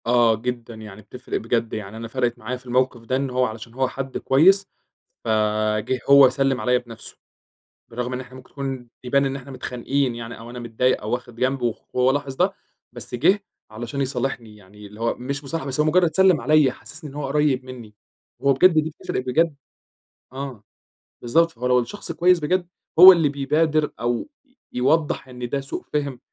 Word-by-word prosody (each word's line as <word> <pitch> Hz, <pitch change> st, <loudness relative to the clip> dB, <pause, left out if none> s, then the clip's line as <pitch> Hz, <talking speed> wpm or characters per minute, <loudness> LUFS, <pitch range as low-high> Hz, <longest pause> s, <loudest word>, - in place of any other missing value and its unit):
آه، 120 Hz, -1 st, +4 dB
جدًا 120 Hz, +1 st, -5 dB
يعني 105 Hz, -2 st, -11 dB
بتفرِق 125 Hz, +5 st, -6 dB
بجد، 115 Hz, 0 st, -1 dB
يعني 105 Hz, 0 st, -6 dB
أنا 115 Hz, 0 st, -6 dB
فرَقِت 120 Hz, +1 st, -1 dB
معايا 120 Hz, +3 st, -4 dB
في 125 Hz, -, -21 dB
الموقف 125 Hz, -1 st, 0 dB
ده، 115 Hz, +3 st, -2 dB
إن 135 Hz, 0 st, -1 dB
هو 125 Hz, 0 st, +1 dB
علشان 110 Hz, 0 st, -7 dB
هو 130 Hz, +1 st, 0 dB
حد 135 Hz, 0 st, -5 dB
كويس 190 Hz, +9 st, +4 dB, 0.6 s
فجِه 110 Hz, +2 st, 0 dB
هو 140 Hz, -1 st, +9 dB
سلِّم 135 Hz, -1 st, 0 dB
عليَّ 125 Hz, +3 st, +2 dB
بنفْسه 120 Hz, -2 st, -11 dB, 0.7 s
برغم 125 Hz, +2 st, -4 dB
إن 125 Hz, -, -3 dB
إحنا 130 Hz, 0 st, -13 dB
ممكن 130 Hz, 0 st, -14 dB
تكون 135 Hz, -3 st, -5 dB
يبان 140 Hz, +2 st, +2 dB
إن 135 Hz, 0 st, -2 dB
احنا 135 Hz, 0 st, -9 dB
متخانقين 130 Hz, 0 st, -2 dB
يعني 115 Hz, 0 st, -8 dB
أو 115 Hz, +1 st, -10 dB
أنا 125 Hz, +1 st, -8 dB
متضايق 120 Hz, +2 st, 0 dB
أو 105 Hz, -, -5 dB
واخِد 120 Hz, -1 st, -4 dB
جنب 130 Hz, +2 st, 0 dB
وخ 120 Hz, -2 st, -2 dB
هو 125 Hz, +1 st, +4 dB
لاحظ 140 Hz, -1 st, -3 dB
ده، 185 Hz, +6 st, +1 dB, 0.4 s
بس 120 Hz, 0 st, -7 dB
جِه 180 Hz, -, +3 dB, 0.3 s
علشان 120 Hz, +5 st, -5 dB
يصالحني، 125 Hz, -4 st, -3 dB
يعني 105 Hz, +1 st, -14 dB
اللي 105 Hz, +2 st, -14 dB
هو 115 Hz, -, +1 dB
مش 140 Hz, +3 st, -5 dB
مصالحة 145 Hz, +1 st, -4 dB
بس 135 Hz, 0 st, -3 dB
هو 150 Hz, -, +4 dB
مُجرّد 175 Hz, +1 st, +3 dB
سلِّم 190 Hz, -6 st, +4 dB
عليَّ، 150 Hz, +1 st, +4 dB
حسّسني 155 Hz, +3 st, -11 dB
إن 135 Hz, -, -13 dB
هو 145 Hz, -1 st, -3 dB
قريّب 140 Hz, -2 st, +1 dB
منّي، 120 Hz, -5 st, -10 dB, 0.5 s
هو 140 Hz, 0 st, +5 dB
بجد 185 Hz, +5 st, +5 dB
دي 155 Hz, 0 st, +2 dB
بتفرِق -, -, -3 dB
بجد، 155 Hz, +5 st, +1 dB, 0.8 s
آه 130 Hz, -5 st, -7 dB, 0.6 s
بالضبط، 165 Hz, +8 st, +2 dB
فهو 125 Hz, -1 st, -4 dB
لو 125 Hz, 0 st, +4 dB
الشخص 125 Hz, +12 st, -5 dB
كويس 180 Hz, 0 st, +3 dB
بجد 175 Hz, +3 st, 0 dB, 0.3 s
هو 185 Hz, +2 st, +13 dB
اللي 165 Hz, -5 st, +3 dB
بيبادر 150 Hz, +2 st, +1 dB
أو 120 Hz, -, -2 dB, 0.4 s
يوضّح 145 Hz, +3 st, +1 dB
إن 125 Hz, -1 st, -7 dB
ده 140 Hz, +3 st, -1 dB
سوء 135 Hz, -, -6 dB
فهْم. 140 Hz, -4 st, -2 dB
130 Hz, 190 wpm, -23 LUFS, 120-140 Hz, 0.8 s, هو